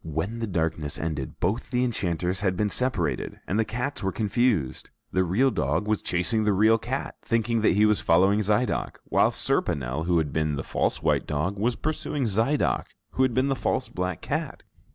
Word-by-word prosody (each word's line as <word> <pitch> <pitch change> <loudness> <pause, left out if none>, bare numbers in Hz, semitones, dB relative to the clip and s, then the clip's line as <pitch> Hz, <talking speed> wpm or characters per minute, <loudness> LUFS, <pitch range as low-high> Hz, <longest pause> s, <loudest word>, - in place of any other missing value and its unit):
When 80 +9 -3
the 115 - -2
darkness 80 -6 -1
ended, 75 -3 -4
both 100 +7 -1
the 125 0 +1
enchanters 90 -6 -1
had 95 -3 0
been 105 +1 0
separated 125 -10 -1
and 100 - -1
the - - +4
cats 125 +7 -3
were 95 -1 -1
confused, 105 - 0 0.2
the 95 - +2
real 110 +10 +2
dog 105 - -1
was 110 -1 +1
chasing 110 +6 0
the 105 -1 +2
real 110 +3 +4
cat, 130 +5 -4
thinking 115 0 0
that 110 - +4
he 105 +3 +4
was 105 -1 +2
following 95 +5 +4
Zidoc, 105 +4 0
while - - +3
Serponel, 70 +4 0
who 90 -1 +3
had 80 -3 -1
been 75 -2 0
the 70 - -4
false - - -1
white - - +1
dog, 75 +7 -1
was 115 +4 0
pursuing 150 -2 -2
Zidoc, 115 +8 +1 0.3
who - - -1
had 130 -3 +2
been 130 +2 +2
the 135 - +1
false 130 - -1
black 90 -1 -3
cat! - - -3
105 Hz, 195 wpm, -26 LUFS, 85-115 Hz, 0.3 s, the